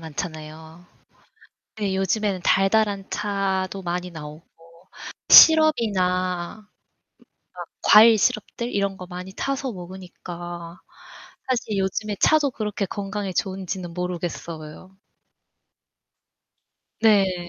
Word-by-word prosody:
많잖아요. 160 +1 -8 0.9
네, 200 -3 -2
요즘에는 195 0 -1
달달한 195 0 +2
차도 195 -2 -2
많이 180 +1 -4
나오고 155 -1 -10 0.9
시럽이나 185 - +5 1.0
뭔가 - - -10
과일 220 +1 +7
시럽들 235 +1 -1
이런 200 -1 -1
거 180 - -9
많이 180 +1 -8
타서 275 +3 -3
먹으니까 175 -2 -9 0.7
사실 225 -5 -1
요즘에 200 +2 -2
차도 300 -3 +3
그렇게 210 -3 -3
건강에 195 0 -5
좋은지는 185 -2 -4
모르겠어요. 175 -1 -6 2.0
네. 190 -5 +2
190 Hz, 220 characters per minute, -23 LUFS, 175-210 Hz, 2.0 s, 과일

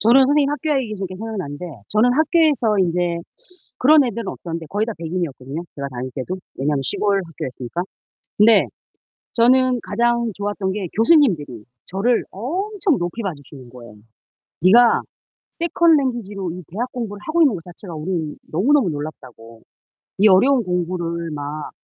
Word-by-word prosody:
저는 235 +5 +6
선생님이 285 0 +3
학교 295 -1 0
얘기하시니까 200 -5 -5
생각나는데 185 -8 -5 0.2
저는 225 +4 +3
학교에서 295 - +3
인제 175 -1 +1 0.6
그런 295 +2 +6
애들은 230 -3 -3
없었는데 165 -1 -6
거의 210 +3 -1
다 230 - -3
백인이었거든요, 160 -4 -4
제가 140 -1 -4
다닐 130 0 -6
때도. 145 +8 -4 0.2
왜냐면 140 +1 0
시골 200 +9 +1
학교였으니까. 140 -1 -5 0.5
근데 215 +1 +6 0.7
저는 255 +1 +4
가장 235 +1 +1
좋았던 205 -1 -2
게 200 -2 -3
교수님들이 205 - +3 0.2
저를 225 +6 +1
엄청 360 - -1
높이 175 +5 -3
봐주시는 145 -8 -7
거예요. 120 -3 -13 0.7
네가 230 +7 +6 0.5
세컨 340 -1 +3
랭귀지로 210 - -3
이 180 +2 -8
대학 240 +8 -4
공부를 210 -5 -5
하고 325 +2 +1
있는 280 -9 +4
것 165 - -8
자체가 175 +1 -9
우리는 155 -1 -3 0.2
너무너무 240 - +3
놀랍다고. 125 -7 -8 0.6
이 210 +2 +6
어려운 245 +7 +5
공부를 170 -2 -2
막 150 0 -5
195 Hz, 365 characters per minute, -21 LUFS, 165-245 Hz, 0.7 s, 저는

